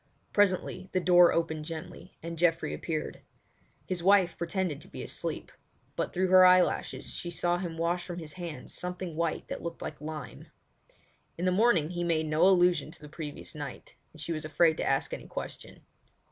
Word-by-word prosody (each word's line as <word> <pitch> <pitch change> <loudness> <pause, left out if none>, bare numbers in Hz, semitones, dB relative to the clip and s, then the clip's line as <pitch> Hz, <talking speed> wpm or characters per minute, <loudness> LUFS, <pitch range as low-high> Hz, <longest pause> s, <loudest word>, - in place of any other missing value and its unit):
Presently 185 -2 +1
the 185 - +3
door 175 -1 +6
opened 160 -2 -1
gently, 160 -1 -8
and 165 0 -5
Geoffrey 170 -1 +2
appeared. 155 -2 -4 0.6
His 185 -2 -3
wife 190 -1 +4
pretended 170 -3 -2
to - - -13
be - - -7
asleep; - - -4 0.4
but - - -2
through 185 +1 0
her 185 0 +8
eyelashes 185 0 +3
she 175 - -4
saw 175 +1 0
him 170 -3 -5
wash 170 +2 0
from 175 -2 -6
his 155 -3 -7
hands 170 -3 -7
something 180 -2 -5
white 165 0 -1
that - - -5
looked 170 0 -6
like 150 - -6
lime. 155 -4 -7 0.9
In 175 - -2
the 185 - +3
morning 180 -6 +3
he 175 -1 -2
made 165 -2 +1
no 155 +4 +4
allusion 175 -5 +4
to 165 - -13
the 150 - -11
previous 150 -1 -7
night, 145 -4 -8 0.2
and 160 - -16
she 150 +3 -3
was 155 - -4
afraid 160 +1 +3
to - - -1
ask 135 0 0
any - - -6
question. - - -7
170 Hz, 185 wpm, -29 LUFS, 155-180 Hz, 0.9 s, her